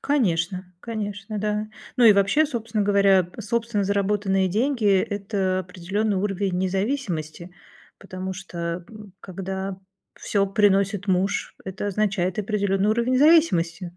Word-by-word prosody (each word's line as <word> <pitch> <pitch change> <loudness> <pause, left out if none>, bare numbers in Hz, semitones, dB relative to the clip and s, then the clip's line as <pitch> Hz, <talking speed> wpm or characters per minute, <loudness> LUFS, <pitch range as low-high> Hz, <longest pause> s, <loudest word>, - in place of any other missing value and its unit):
Конечно, 185 - 0 0.2
конечно, 210 -2 -5
да. 210 +1 -2 0.3
Ну 245 - +4
и 215 - +9
вообще, 200 +11 +3
собственно 230 -5 -2
говоря, 200 -3 +4
собственно 225 -1 -1
заработанные 200 -1 +1
деньги- 235 +4 0
это 195 -2 -1
определенный 190 +4 -2
уровень 195 -1 -1
независимости, 185 - -2 0.5
потому 190 -1 -6
что, 170 -2 -5
м, 210 -3 -12
когда 190 +1 -5 0.4
всё 200 -1 0
приносит 200 0 +2
муж- 190 +1 0
это 190 +2 -5
означает 195 -3 -1
определенный 200 -1 0
уровень 235 +3 +1
зависимости. 180 - +3
200 Hz, 115 wpm, -24 LUFS, 185-215 Hz, 0.5 s, и